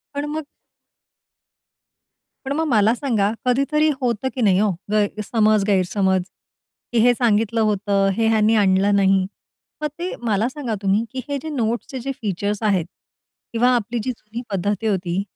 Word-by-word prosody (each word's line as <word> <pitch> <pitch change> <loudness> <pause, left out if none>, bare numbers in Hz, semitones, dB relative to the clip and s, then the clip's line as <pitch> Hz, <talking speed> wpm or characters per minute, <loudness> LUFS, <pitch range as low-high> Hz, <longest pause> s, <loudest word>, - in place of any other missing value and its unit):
पण 285 +1 -2
मग 310 -1 -4 2.0
पण 275 - -1
मग 320 +2 0
मला 220 -4 +4
सांगा, 220 -7 0
कधीतरी 275 +5 +2
होतं, 240 0 0
की 255 - -2
नाही 195 -4 +4
ओ, 210 - +3 0.2
गैसमज 215 0 +2
गैरसमज, 190 -1 +2 0.7
की 230 - +3
हे 245 - +6
सांगितलं 225 -1 +1
होतं, 200 -1 +1
हे 225 -1 +2
ह्यांनी 220 0 +3
आणलं 200 0 +3
नाही? 195 -1 +3 0.6
मग 300 - 0
ते 360 +1 -3
मला 215 +1 +1
सांगा 255 -6 -4
तुम्ही, 200 +3 +2
की 260 -1 -4
हे 285 - -1
जे 315 - -4
नोट्सचे 240 +2 -2
जे 275 +3 -3
फीचर्स 205 +1 -2
आहेत 195 -6 +2 0.7
किंवा 240 +2 +3
आपली 235 +1 -2
जी 255 - -1
जुनी 225 0 -8
पद्धती 205 +3 -1
होती, 185 -2 -1
215 Hz, 150 wpm, -21 LUFS, 200-245 Hz, 2.0 s, हे